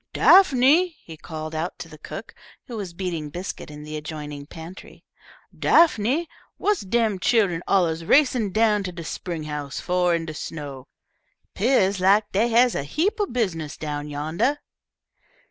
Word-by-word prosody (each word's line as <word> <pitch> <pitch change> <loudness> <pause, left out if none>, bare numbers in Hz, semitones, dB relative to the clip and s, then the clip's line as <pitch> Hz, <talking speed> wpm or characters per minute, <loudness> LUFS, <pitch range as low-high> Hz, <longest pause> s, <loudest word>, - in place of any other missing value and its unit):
"Daphne," 320 0 +5
he 165 - -10
called 155 0 -7
out 160 +3 -3
to - - -8
the - - -14
cook, - - -8 0.3
who 240 - -8
was 200 -5 -5
beating 170 -5 -4
biscuit 180 +2 -6
in 150 0 -10
the 155 0 -7
adjoining 150 -2 -7
pantry, 165 +4 -11 0.5
"Daphne, 315 0 +3 0.3
what's 415 -1 +1
dem 215 0 0
chillun 190 -6 +2
alluz 170 -4 +2
racin' 250 - +3
down 215 0 +3
to 185 -2 -4
de 170 -1 -8
spring 165 0 -5
house 150 -2 -5
fo' 180 0 +1
in 170 -1 +1
de 155 - -6
snow? 145 -4 -7 0.7
Peah's 200 -4 +2
lak 205 +3 +3
dee 220 +5 +2
has 240 +1 +4
a - - -1
heap 320 - -1
o' 410 - +1
business 175 - -2
down 150 -1 -4
yandah." 160 - -1
180 Hz, 155 wpm, -24 LUFS, 155-230 Hz, 0.7 s, Daphne